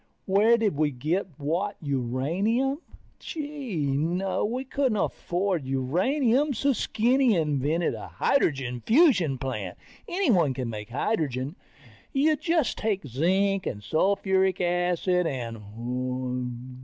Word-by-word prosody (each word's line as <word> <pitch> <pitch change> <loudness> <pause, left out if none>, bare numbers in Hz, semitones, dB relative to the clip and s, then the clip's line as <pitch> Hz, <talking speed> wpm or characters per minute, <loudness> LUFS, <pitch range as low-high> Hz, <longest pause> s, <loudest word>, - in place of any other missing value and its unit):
Where 210 +5 +4
did 210 -9 0
we 155 0 +2
get 155 +9 -1
what 175 +8 -2
uranium? 165 - 0 0.4
Gee, 285 - -4
no, 165 +8 0
we 245 +5 -1
couldn't 265 -4 0
afford 175 -6 -1
uranium, 235 - +1
so 280 +5 +2
Skinny 245 +1 +2
invented 155 +1 0
a - - -7
hydrogen 130 - 0
fusion 220 - +4
plant. 110 -8 -4 0.3
Anyone 215 - +2
can 125 -3 -3
make 105 0 -7
hydrogen. 140 - -1 0.6
You 305 +3 +3
just 325 -2 0
take 205 -6 -1
zinc 190 - +1
and 105 -2 -4
sulfuric 190 - +1
acid 180 0 +1
and 125 +1 -4
175 Hz, 110 wpm, -26 LUFS, -, 0.6 s, Where